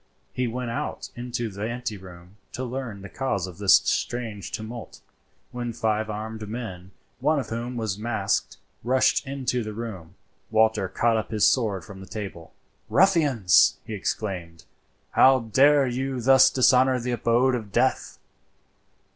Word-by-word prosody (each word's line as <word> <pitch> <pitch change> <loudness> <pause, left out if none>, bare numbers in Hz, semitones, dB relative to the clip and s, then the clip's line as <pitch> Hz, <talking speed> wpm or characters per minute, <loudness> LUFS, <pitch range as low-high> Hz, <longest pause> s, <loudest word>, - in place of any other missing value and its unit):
He 125 -1 -1
went 120 0 -4
out 115 - -4
into 120 -1 -4
the 105 +2 -5
ante 120 -2 -4
room 90 0 -13 0.2
to 130 - -4
learn 120 -5 -5
the - - -7
cause 100 -4 -2
of 90 -1 -10
this 100 -2 +6
strange 110 -6 -1
tumult, 110 +2 -7 0.5
when 120 -1 -4
five 110 -1 -1
armed 110 0 -6
men, 95 -6 -6 0.3
one 150 +4 +2
of 130 -5 -3
whom 120 +2 -4
was 110 -3 -3
masked, 115 +1 -1 0.3
rushed 130 +2 +2
into 130 -2 -2
the 110 0 -6
room. 105 -8 -7 0.3
Walter 110 -3 +2
caught 115 -1 +1
up 110 - -3
his 110 -2 +2
sword 105 -9 0
from 95 +2 -11
the 95 - -11
table. 95 -6 -7 0.4
"Ruffians!" 150 - +4
he 110 - -6
exclaimed, 90 -5 -4 0.5
"how 130 -1 +5
dare 135 +5 +4
you 130 +1 -2
thus 130 +2 +6
dishonour 130 0 +4
the 125 +1 -3
abode 120 +2 +2
of 110 -5 -4
death?" - - 0
115 Hz, 150 wpm, -25 LUFS, 105-125 Hz, 0.5 s, this